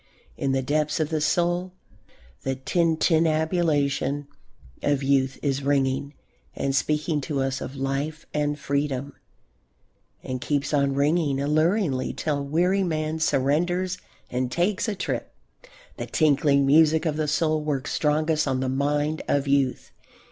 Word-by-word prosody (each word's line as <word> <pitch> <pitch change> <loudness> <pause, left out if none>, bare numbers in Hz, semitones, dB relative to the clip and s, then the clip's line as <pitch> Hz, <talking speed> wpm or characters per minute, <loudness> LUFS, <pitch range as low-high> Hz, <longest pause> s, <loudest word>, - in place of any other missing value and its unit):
In 135 - -1
the 135 0 0
depths 150 +3 0
of 155 -1 0
the 155 -2 -1
soul 175 +3 +1 0.7
the 135 0 -2
tintinnabulation 155 -2 +1 0.6
of 145 -1 +1
youth 135 -1 +2
is 140 -1 0
ringing 140 0 0 0.4
and 135 0 -1
speaking 150 +1 0
to 140 0 -3
us 135 0 -1
of 130 - -6
life 140 +4 -3
and 150 0 0
freedom, 140 -1 -2 1.1
and 130 -1 -4
keeps 140 +3 -1
on 140 -1 +2
ringing 145 -1 +1
alluringly 155 -1 +1
till 145 -3 -2
weary 175 +7 +1
man 155 -2 -2
surrenders 175 +6 +1 0.3
and 125 0 -1
takes 185 - 0
a 215 - -1
trip. - - -4 0.6
The - - -5
tinkling 145 -2 +3
music 155 +3 +4
of 155 -2 0
the 155 0 -1
soul 155 +1 +1
works 145 -3 -2
strongest 155 0 +1
on 130 -1 0
the 130 0 -1
mind 145 +3 0
of 140 0 +1
youth. 140 -2 +1
145 Hz, 135 wpm, -25 LUFS, 140-160 Hz, 1.1 s, music